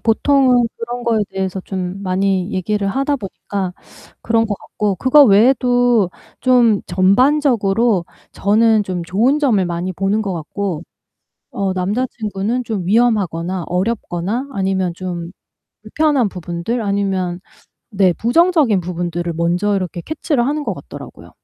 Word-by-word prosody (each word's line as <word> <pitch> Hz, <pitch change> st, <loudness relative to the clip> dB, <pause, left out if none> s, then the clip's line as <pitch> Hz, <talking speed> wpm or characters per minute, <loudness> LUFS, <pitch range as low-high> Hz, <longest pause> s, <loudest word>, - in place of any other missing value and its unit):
보통은 250 Hz, +1 st, +3 dB
그런 240 Hz, +1 st, -5 dB
거에 230 Hz, -2 st, +1 dB
대해서 190 Hz, -1 st, -3 dB
좀 185 Hz, 0 st, -5 dB
많이 190 Hz, +1 st, 0 dB
얘기를 200 Hz, +2 st, -1 dB
하다 275 Hz, +7 st, 0 dB
보니까 195 Hz, -4 st, -5 dB, 0.5 s
그런 225 Hz, 0 st, +1 dB
것 210 Hz, -, -2 dB
같고 205 Hz, -3 st, -3 dB
그거 280 Hz, -, +6 dB
외에도 245 Hz, -1 st, +3 dB, 0.3 s
좀 240 Hz, -5 st, +3 dB
전반적으로 215 Hz, -, +2 dB, 0.3 s
저는 215 Hz, +2 st, +3 dB
좀 185 Hz, -3 st, -4 dB
좋은 225 Hz, -, +1 dB
점을 235 Hz, -10 st, +2 dB
많이 175 Hz, +1 st, -3 dB
보는 195 Hz, +4 st, 0 dB
것 200 Hz, -4 st, -3 dB
같고 170 Hz, +1 st, -4 dB, 0.7 s
어 195 Hz, -1 st, -1 dB
남자친구는 210 Hz, +3 st, -2 dB
좀 215 Hz, -5 st, -3 dB
위험하거나 190 Hz, -5 st, +1 dB
어렵거나 195 Hz, +4 st, -2 dB
아니면 190 Hz, -3 st, -1 dB
좀 175 Hz, -2 st, -5 dB, 0.5 s
불편한 295 Hz, -7 st, +1 dB
부분들 180 Hz, +6 st, -4 dB
아니면 195 Hz, -4 st, -1 dB, 0.5 s
네 195 Hz, -4 st, +3 dB
부정적인 275 Hz, -, +2 dB
부분들을 175 Hz, -1 st, -3 dB
먼저 175 Hz, +5 st, 0 dB
이렇게 180 Hz, -2 st, -4 dB
캐치를 290 Hz, -, -1 dB
하는 295 Hz, +3 st, -1 dB
것 -, -, -2 dB
같더라고요. -, -, -11 dB
200 Hz, 295 characters per minute, -18 LUFS, 185-240 Hz, 0.7 s, 그거